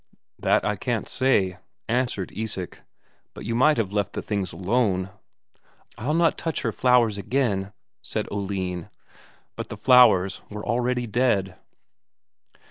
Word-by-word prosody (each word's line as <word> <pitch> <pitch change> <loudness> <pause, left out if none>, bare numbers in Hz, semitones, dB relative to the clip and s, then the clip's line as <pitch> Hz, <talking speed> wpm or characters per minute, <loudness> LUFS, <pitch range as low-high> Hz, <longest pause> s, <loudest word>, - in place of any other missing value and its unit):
"That - - +2
I - - 0
can't - - -2
say," 100 -9 +1 0.3
answered 120 -5 -1
Isak. 105 -5 -4 0.6
"But - - -8
you 115 - -2
might 150 +5 +4
have 100 -4 -1
left 100 -1 -1
the - - -4
things 100 -4 -2
alone." 95 +1 0 0.8
"I'll 145 +8 -2
not 165 0 +2
touch 165 -3 -3
her 115 - 0
flowers 120 -3 +3
again," 100 -4 -1 0.3
said - - -4
Oline. 95 -3 -3 0.7
But - - -6
the 105 - -7
flowers 105 -6 +5
were 105 0 -7
already 125 +2 0
dead. 105 -5 +1
105 Hz, 130 wpm, -25 LUFS, 95-125 Hz, 0.8 s, flowers